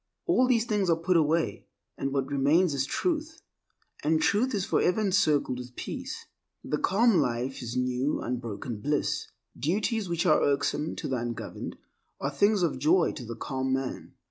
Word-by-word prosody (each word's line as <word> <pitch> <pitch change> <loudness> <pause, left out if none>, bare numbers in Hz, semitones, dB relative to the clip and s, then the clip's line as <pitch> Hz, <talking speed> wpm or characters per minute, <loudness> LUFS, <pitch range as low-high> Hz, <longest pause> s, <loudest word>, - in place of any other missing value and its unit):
All 255 -8 +3
these 235 -3 +3
things 210 -5 0
are 165 - +5
put 170 +3 0
away, 160 0 +1 0.3
and 135 - -3
what 135 -1 0
remains 145 +5 +2
is 135 -1 0
Truth, 320 - -2 0.6
and 155 +1 +3
Truth 230 +9 +2
is 195 -2 -1
forever 180 +4 +2
encircled 155 -10 +2
with 125 0 -9
peace. - - -6 0.4
The - - -2
calm 220 +1 +3
life 125 -1 -1
is 120 0 -4
new 125 +3 0
unbroken 120 -2 -4
bliss. 145 +3 -1 0.3
Duties 205 - -1
which 170 0 0
are 155 -4 +5
irksome 145 +2 0
to - - -4
the 130 - -1
ungoverned 120 -1 -5 0.4
are 140 - -2
things 200 +6 +3
of 155 -6 0
joy 165 +5 +3
to 130 - -8
the 115 0 -6
calm 130 +1 -2
man. 135 -1 -4
150 Hz, 170 wpm, -28 LUFS, 130-195 Hz, 0.6 s, are